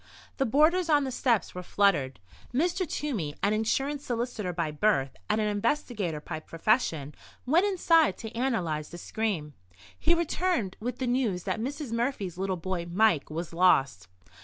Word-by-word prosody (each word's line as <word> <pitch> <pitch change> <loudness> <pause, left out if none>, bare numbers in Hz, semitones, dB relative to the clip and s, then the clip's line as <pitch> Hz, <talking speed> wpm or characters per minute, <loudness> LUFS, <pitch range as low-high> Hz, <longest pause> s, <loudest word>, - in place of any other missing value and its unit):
The 270 - +1
boarders 325 +7 +3
on 295 -2 +4
the 265 - -3
steps 240 -3 +1
were 180 - -5
fluttered. 175 - +1 0.3
Mr. 345 +6 0
Toomey, 210 - -3
an 205 +1 +3
insurance 270 +7 0
solicitor 235 -6 -2
by 170 -3 -2
birth 150 -5 +1
and 215 - +2
an 215 - +1
investigator 210 - -1
by 155 +1 -6
profession, 165 - 0 0.3
went 335 +10 +4
inside 335 -5 +3
to 225 0 -8
analyse 180 - -1
the 175 - -9
scream. 175 -6 -3 0.5
He 340 +2 +3
returned 335 - 0
with 245 +3 -4
the 260 - -2
news 240 -8 0
that 220 - -2
Mrs. 275 +1 -4
Murphy's 230 -7 -2
little 190 -1 -1
boy, 175 0 -3
Mike, 180 -4 +2
was 165 +2 -5
lost. 135 - +3
215 Hz, 160 wpm, -28 LUFS, 170-270 Hz, 0.5 s, on